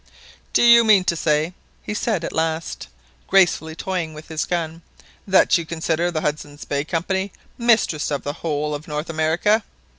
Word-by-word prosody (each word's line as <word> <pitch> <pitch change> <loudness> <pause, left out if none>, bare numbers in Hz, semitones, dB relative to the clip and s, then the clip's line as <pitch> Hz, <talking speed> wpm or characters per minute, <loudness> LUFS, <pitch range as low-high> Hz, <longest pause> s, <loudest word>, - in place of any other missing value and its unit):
"Do - - +3
you 235 0 +8
mean 210 -4 +5
to 170 - 0
say," 155 +1 0 0.3
he - - -4
said 210 -4 -1
at - - -4
last, 160 0 -2 0.4
gracefully 175 -4 +3
toying 170 -3 -3
with 155 +1 -11
his 160 -1 -2
gun, 165 -1 -3 0.5
"that 190 -1 +4
you - - -4
consider 165 +1 -1
the 160 -3 -2
Hudson's 145 -1 -4
Bay 140 0 -1
Company 190 +5 -2 0.2
mistress 230 -10 +2
of 145 -2 -3
the 145 - -3
whole 150 -2 -2
of 145 +1 -6
North 150 +2 -4
America?" 165 +8 +1
165 Hz, 170 wpm, -21 LUFS, 155-190 Hz, 0.5 s, you